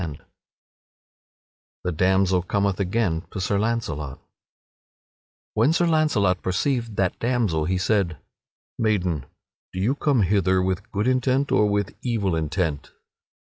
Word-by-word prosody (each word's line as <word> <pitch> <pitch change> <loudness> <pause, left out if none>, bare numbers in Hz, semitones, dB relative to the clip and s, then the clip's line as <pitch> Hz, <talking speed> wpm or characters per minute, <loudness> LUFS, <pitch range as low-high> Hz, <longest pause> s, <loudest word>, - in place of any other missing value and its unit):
[Sidenote: 75 -5 -7 1.6
The 90 - -1
damsel 95 +2 +2
cometh 100 +1 0
again 95 -4 0
to 100 - -6
Sir 100 +2 0
Launcelot] 80 - -2 1.3
When 120 +9 +3
Sir 175 +1 +2
Launcelot 150 - +2
perceived 115 +4 -1
that 95 -2 0
damsel 115 -11 0
he 90 +3 0
said: 95 -4 +1 0.6
"Maiden, 90 - 0 0.4
do 95 - -5
you 110 +8 +2
come 140 -5 +2
hither 95 -1 +2
with 95 0 -2
good 105 +3 -1
intent 130 +2 +1
or 105 - +3
with 100 -2 -1
evil 105 -8 0
intent?" 80 -1 -2
100 Hz, 125 wpm, -24 LUFS, 90-115 Hz, 1.6 s, When